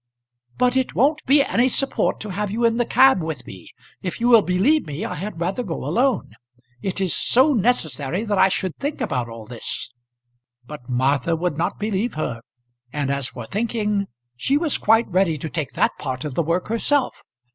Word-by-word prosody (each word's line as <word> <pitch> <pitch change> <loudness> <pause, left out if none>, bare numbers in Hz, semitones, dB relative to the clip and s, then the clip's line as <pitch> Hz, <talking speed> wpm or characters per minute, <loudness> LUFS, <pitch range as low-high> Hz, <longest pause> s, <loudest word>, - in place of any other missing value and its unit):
"But 250 0 +2
it 260 -1 0
won't 295 +5 +2
be 280 +2 +6
any 255 -1 +2
support 270 +2 0
to 215 - -5
have 205 +2 -2
you 230 +4 0
in 230 0 +2
the 240 - 0
cab 265 -8 +5
with 160 -1 -5
me. 95 -3 -11 0.3
If 180 - -4
you 240 +1 +2
will 230 -3 +8
believe 205 - +2
me, 150 +8 -4
I - - -4
had 190 +2 -6
rather 185 +7 -1
go - - -4
alone. 255 - +1 0.5
It 190 +3 -3
is 190 -3 0
so 265 +5 +4
necessary 180 - 0
that 205 -3 0
I - - +6
should 185 -2 -2
think 285 +2 -3
about 130 - -2
all 115 -1 -9
this." 120 +1 -6 0.7
But 130 -2 -10
Martha 135 +5 +1
would 175 -1 -1
not 165 +3 -1
believe 210 +1 -2
her; 120 -7 -3 0.5
and 140 -1 -1
as 140 -2 -1
for - - -8
thinking, 210 -2 -1 0.3
she 270 - +1
was 310 -2 +1
quite 225 +2 +4
ready 180 -3 +1
to 155 +2 -5
take 155 -5 -3
that - - +2
part 130 0 -4
of 150 - -4
the 170 - +1
work 170 +3 -1
herself. 255 +4 0
195 Hz, 195 wpm, -22 LUFS, 150-240 Hz, 0.7 s, will